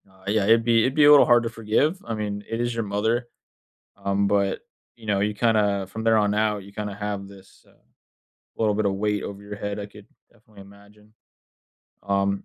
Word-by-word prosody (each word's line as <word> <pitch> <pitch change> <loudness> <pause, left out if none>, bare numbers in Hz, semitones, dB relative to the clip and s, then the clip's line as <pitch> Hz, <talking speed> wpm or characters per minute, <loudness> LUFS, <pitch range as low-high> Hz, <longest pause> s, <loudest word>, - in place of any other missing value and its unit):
Uh, 95 0 -23
yeah, 105 0 +1
it'd 115 +2 +4
be 115 -1 +3
it'd 130 +4 0
be 150 -2 +5
a 145 - +8
little 145 - +8
hard 120 -1 +4
to 115 - -2
forgive. 115 - 0
I 115 - -3
mean, 105 -1 -4
it 115 +1 -3
is 120 0 -1
your 115 0 -2
mother. 110 +4 -1 0.7
Um, 100 0 0
but, 100 -1 +1 0.3
you 115 -2 -15
know, 100 -2 +1
you 105 +1 0
kinda 105 -3 +1
from 110 +4 -7
there 115 -1 +4
on 105 -1 +1
out, 105 -1 0
you 100 - -14
kinda 105 -1 -5
have 100 -1 -5
this, 95 -1 -17
uh, - - -23 0.8
little 110 -2 +1
bit 105 0 0
of 100 - 0
weight 105 0 -1
over 100 0 -7
your 100 0 -8
head, 105 0 -4
I 100 - -5
could 105 0 -15 0.3
definitely 110 -3 -17
imagine, 100 +2 -19 0.9
um 100 0 -1
105 Hz, 210 wpm, -24 LUFS, 100-115 Hz, 0.9 s, a